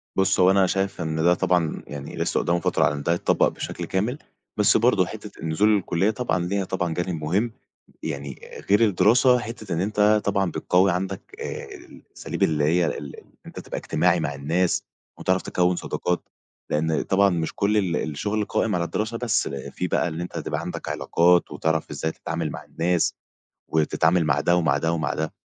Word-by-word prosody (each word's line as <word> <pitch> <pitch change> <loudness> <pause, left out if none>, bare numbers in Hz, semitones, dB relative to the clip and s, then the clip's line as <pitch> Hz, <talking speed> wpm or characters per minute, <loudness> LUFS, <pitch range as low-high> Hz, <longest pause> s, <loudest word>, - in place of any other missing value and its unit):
بُص، 95 0 +2
هو 90 0 +6
أنا 95 -1 +4
شايف 95 -1 -1
إن 80 -1 -2
ده 90 +1 +5
طبعًا 90 -3 0
يعني 70 -1 -7
لسه - - 0
قدّامه 85 0 +1
فترة - - +1
على - - +1
إن 70 - -5
ده 85 - +2
يتطبق 85 - +2
بشكل - - -5
كامل، 110 +8 -1 0.4
بس - - +4
برضو - - +3
حتّة - - -9
النزول 100 +7 +2
للكلية 95 0 +1
طبعًا 120 -5 -1
ليها 100 +2 -1
طبعًا 90 -3 -2
جانب 90 -2 -3
مهم، 100 +10 0 0.5
يعني 70 -4 -5 0.3
غير 100 +3 +5
الدراسة، 115 +4 +4
حتّة 110 -5 -6
إن 85 - 0
أنت 105 +1 +3
طبعًا 100 -3 +1
بتقوي 95 +4 +2
عندك 95 +2 -3 0.2
آآ، - - -5
الأساليب - - -7
اللي 75 -2 +2
هي 85 +4 +3
ال 70 -4 -4 0.3
أنت - - -9
تبقى - - -6
إجتماعي - - +1
مع - - -2
الناس 85 +6 0 0.4
وتعرف 95 0 +1
تكوّن 90 0 +1
صداقات. 90 0 -3 0.4
لأن 80 +1 +1
طبعًا 100 +1 +3
مش 85 -3 -2
كل 105 +2 +1
ال 95 -5 +1
الشغل 105 +9 -2
قائم 110 0 0
على 85 - 0
الدراسة 110 +6 -2
بس، 115 -3 0
في 70 +6 -4
بقى - - +1
اللي 85 +1 -4
أنت 90 - -7
تبقى - - -3
عندك - - -5
علاقات 85 +1 +2
وتعرف 80 0 -1
إزاي 80 - -2
تتعامل 85 -2 -4
مع - - -7
الناس، 85 0 0 0.6
وتتعامل 80 +2 +2
مع 75 -1 +2
ده 85 +4 +3
ومع 85 -1 +2
ده 80 0 0
ومع 80 -3 -1
ده، 80 0 -3
90 Hz, 185 wpm, -24 LUFS, 80-100 Hz, 0.6 s, هو